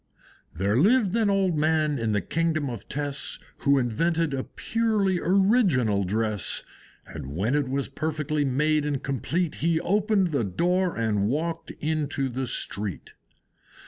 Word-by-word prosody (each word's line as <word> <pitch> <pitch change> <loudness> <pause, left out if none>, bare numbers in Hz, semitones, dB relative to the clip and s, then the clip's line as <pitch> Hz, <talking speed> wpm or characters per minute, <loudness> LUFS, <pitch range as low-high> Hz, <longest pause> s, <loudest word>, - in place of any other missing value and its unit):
There 100 +6 +1
lived 210 - +4
an 225 -3 +2
old 195 -3 +2
man 155 -2 +1
in 115 -1 0
the 105 -1 +1
Kingdom 155 - -1
of 115 -4 -8
Tess, 145 -1 -2 0.2
Who 140 -1 +3
invented 160 +6 0
a 130 -1 -1
purely 215 -5 0
original 180 - +3
dress; 105 0 -1 0.4
And 70 +3 -8
when 105 +9 0
it 145 -3 +1
was 135 +1 -1
perfectly 150 0 -2
made 150 +3 +1
and 145 -2 -2
complete, 145 +6 -1
He 165 0 +2
opened 200 0 +2
the 140 -6 +1
door 175 - 0
and 105 -3 +1
walked 160 +6 -2
into 145 -3 -1
the 130 +1 -3
street. 100 -5 -3
150 Hz, 145 wpm, -26 LUFS, 120-175 Hz, 0.4 s, lived